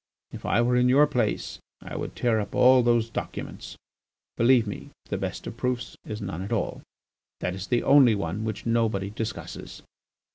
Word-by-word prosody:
If - - -7
I 115 - +3
were 125 +1 +2
in 125 0 +4
your 140 +4 +6
place 145 -5 -1 0.2
I - - -9
would - - -5
tear 115 -3 +1
up 105 - -5
all 130 0 +6
those 120 -1 +2
documents. - - -6 0.6
Believe 120 -1 +4
me, 105 - -7 0.2
the - - -1
best - - -4
of 110 - -7
proofs 125 -1 -2
is 105 0 -5
none 95 -3 -4
at 95 - -6
all. - - -2 0.6
That 90 - -2
is 95 0 -6
the 120 -1 +1
only 135 -6 +6
one 100 +2 -3
which 110 -1 -4
nobody 110 -4 0
discusses." 115 +2 -6
115 Hz, 180 wpm, -26 LUFS, 105-125 Hz, 0.6 s, your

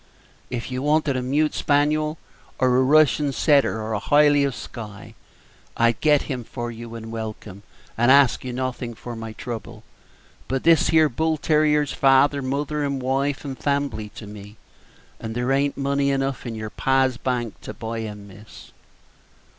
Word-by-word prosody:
If 125 0 -5
you 130 0 -3
wanted 150 -1 +1
a 130 - -1
mute 145 +5 +1
spaniel, 150 +2 +1 0.4
or 130 -1 +2
a 130 - +4
Russian 145 +1 +4
setter, 140 -4 +2
or 110 +1 -3
a 105 - -1
Hile 145 +3 +4
of 135 - -4
Skye, 105 -3 -9 0.6
I'd 115 0 +2
get 150 -2 +4
him 130 -4 -4
for 120 +1 -6
you 115 0 -9
and 115 -1 -8
welcome, 110 -3 -7 0.4
and 120 +2 +4
ask 140 -2 +5
you 130 - -5
nothin' 125 -1 -4
for 120 +2 -8
my 115 -1 -7
trouble; 115 -2 -7 0.6
but 135 0 -2
this 165 -1 +5
here 160 -1 +5
bull 160 +4 -1
terrier's 150 -2 +2
father, 140 +1 +4
mother, 145 +3 -2
and 140 -1 -2
wife, 135 +2 -1
and 135 -2 -4
fambly 140 -7 -1
to 110 - -9
me, 105 +1 -11 0.6
and 110 0 -6
there 125 +2 -1
a'n't 140 +1 +1
money 140 0 0
enough 135 -2 -2
in 115 - -5
your 110 -1 -6
pa's 130 -2 +1
bank 120 -3 -3
to - - -7
buy 115 0 -5
him, 105 -2 -7
miss." 105 +2 -14
130 Hz, 170 wpm, -23 LUFS, 115-145 Hz, 0.6 s, ask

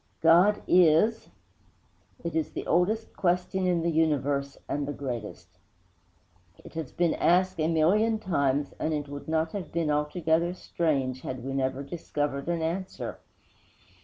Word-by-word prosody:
IV - - -42
God 175 +6 +5
is! 180 +6 +4 0.9
It 170 -2 -4
is 160 -2 0
the - - -4
oldest 205 +7 +1
question 180 0 0
in 175 -2 +1
the 170 - +1
universe, 145 -3 0
and 145 0 -2
the 145 - -3
greatest. 105 -10 -7 1.1
It - - -12
has 160 -5 -5
been 170 -2 +1
asked 185 +1 +2
a 155 - +2
million 165 - 0 0.4
million - - 0
times, 145 -8 0
and 155 0 0
it 145 -1 -4
would 145 0 -8
not 160 0 0
have 195 -6 -6
been 165 -2 0
altogether 160 +3 +1
strange 135 -9 -1
had 130 -2 -6
we 135 - -3
never 135 0 -1
discovered 145 -2 -3
an 170 -2 -1
answer. 185 +4 -4
160 Hz, 155 wpm, -28 LUFS, 140-175 Hz, 1.1 s, God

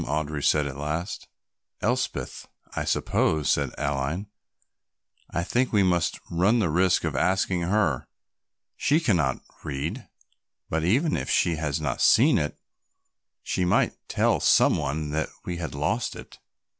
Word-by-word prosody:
Audry 75 0 -2
said 75 -1 +3
at 70 -1 -5
last. 80 +6 -4 0.5
"Elspeth, - - -2 0.3
I - - -2
suppose," 75 -2 +1
said 70 -2 +1
Aline. 75 +8 -2 1.0
"I 85 - -2
think 125 +7 0
we 105 -2 +4
must 90 -2 +1
run 95 +7 +3
the 100 -9 +1
risk 90 +3 +3
of - - -2
asking 95 -1 +1
her. 100 +5 +1 0.7
She 150 +3 +2
cannot 85 - +1 0.2
read, 70 +2 -4 0.6
but 80 0 0
even 135 - +2
if - - -3
she 85 -3 +2
has 75 -3 -1
not - - -2
seen - - +5
it, 75 - -3 0.9
she 90 - -1
might 90 - +2 0.2
tell - - +2
some - - +4
one 75 +1 -2
that 80 -1 -1 0.2
we 90 -1 -3
had 80 -4 -5
lost 100 +12 -1
it. - - -12
85 Hz, 145 wpm, -26 LUFS, 75-95 Hz, 1.0 s, seen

